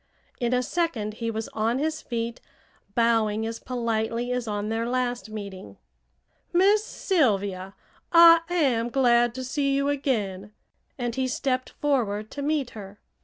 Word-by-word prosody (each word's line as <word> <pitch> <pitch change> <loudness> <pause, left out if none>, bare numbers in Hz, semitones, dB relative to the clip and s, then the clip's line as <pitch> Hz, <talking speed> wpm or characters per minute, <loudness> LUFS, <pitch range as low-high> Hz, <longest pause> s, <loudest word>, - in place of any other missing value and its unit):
In 240 -1 0
a 250 0 +2
second 250 -10 -1
he 230 - -1
was 220 0 -3
on 225 +3 0
his 310 +2 -2
feet, 230 0 -4 0.5
bowing 225 -2 +2
as 225 0 -4
politely 235 -1 -2
as 250 -2 -2
on 205 0 -2
their 225 +1 -1
last 245 -2 -1
meeting. 195 - -8 0.7
"Miss 400 +4 +4
Sylvia, 200 - 0 0.4
I 335 -1 +8
am 260 -10 +1
glad 240 -2 +3
to 260 - -4
see 275 +1 0
you 280 +1 +1
again," 210 -8 -2 0.4
and 240 -2 -2
he 260 +1 -1
stepped 255 0 -1
forward 220 -8 -1
to 285 - -6
meet 290 -3 -1
her. 205 -1 -10
240 Hz, 145 wpm, -26 LUFS, 220-275 Hz, 0.7 s, I